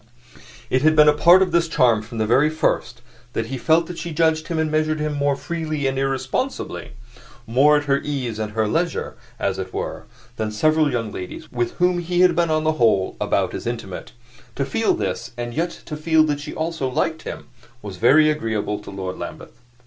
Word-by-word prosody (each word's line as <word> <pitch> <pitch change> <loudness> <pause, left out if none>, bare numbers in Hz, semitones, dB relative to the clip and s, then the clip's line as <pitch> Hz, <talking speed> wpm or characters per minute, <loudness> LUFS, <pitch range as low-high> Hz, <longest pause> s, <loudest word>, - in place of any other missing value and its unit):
It 130 - +2
had 155 +2 +4
been 150 -1 +7
a 150 - +7
part 175 +5 +6
of 185 - -3
this 170 0 +2
charm 125 -8 +3
from 115 +2 -9
the 120 +7 +3
first 120 -6 -1 0.3
that 115 - -1
he 130 +3 -5
felt 165 +3 +3
that 175 0 -7
she 170 - -5
judged 160 0 +1
him 165 - -2
and 160 -1 0
measured 155 0 +1
him 150 0 -1
more 145 -1 +1
freely 155 0 -3
and 135 0 0
irresponsibly 135 - -3 0.5
more 140 +6 +4
at 145 - -1
her 140 -1 +1
ease 130 -7 -3
and 105 -1 -4
her 110 -1 +1
leisure, 165 +7 -1 0.2
as - - -1
it - - -5
were - - -4 0.3
than 110 -1 -1
several 155 +6 +2
young 115 -4 -2
ladies 90 -2 -8
with 120 -1 -2
whom 180 0 +1
he 175 +1 0
had 180 -1 +5
been 170 -1 +2
on 155 0 +1
the 155 - +2
whole 100 -5 +3
about - - 0
as - - -5
intimate. - - -5 0.4
To - - -1
feel - - +1
this, - - -4
and 120 0 -4
yet 165 +5 0 0.2
to 150 - -5
feel 160 +1 +3
that 145 -2 -1
she 150 +1 -7
also 160 -4 -2
liked 160 +4 -1
him, - - -8 0.3
was 100 -3 -7
very 145 +9 +5
agreeable 110 -7 -2
to 105 - -11
Lord 95 -2 -5
Lambeth. - - -8
150 Hz, 205 wpm, -22 LUFS, 120-160 Hz, 0.5 s, been